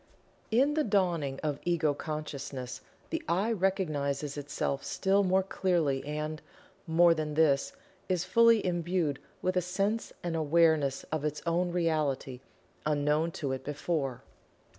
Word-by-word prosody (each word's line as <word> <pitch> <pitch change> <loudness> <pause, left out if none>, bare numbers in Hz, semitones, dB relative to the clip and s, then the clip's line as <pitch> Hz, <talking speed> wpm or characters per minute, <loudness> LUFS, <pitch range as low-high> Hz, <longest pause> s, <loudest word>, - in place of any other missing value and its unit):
In 265 +6 +3
the 310 0 +2
dawning 175 - 0
of 150 -2 -1
Ego 165 -4 +1
Consciousness 140 -4 -5 0.3
the 330 0 -1
"I" 200 +6 +1
recognizes 155 -8 -1
itself 145 -1 -3
still 195 +1 +2
more 190 0 +3
clearly 170 -8 0
and, 150 +1 -4 0.5
more 170 +1 +5
than 155 -2 -3
this, 150 -3 +3 0.4
is 180 -2 +1
fully 230 +3 +5
imbued 175 -4 0 0.2
with 185 0 +1
a 180 - +3
sense 195 +5 -1
and 170 -1 -2
"awareness" 155 -3 +3
of 155 -2 -1
its 150 0 -2
own 175 +1 +1
Reality, 155 -7 0 0.4
unknown 150 +2 +1
to 140 -3 -3
it 130 0 -3
before. 145 -3 -2
160 Hz, 135 wpm, -30 LUFS, 145-185 Hz, 0.5 s, more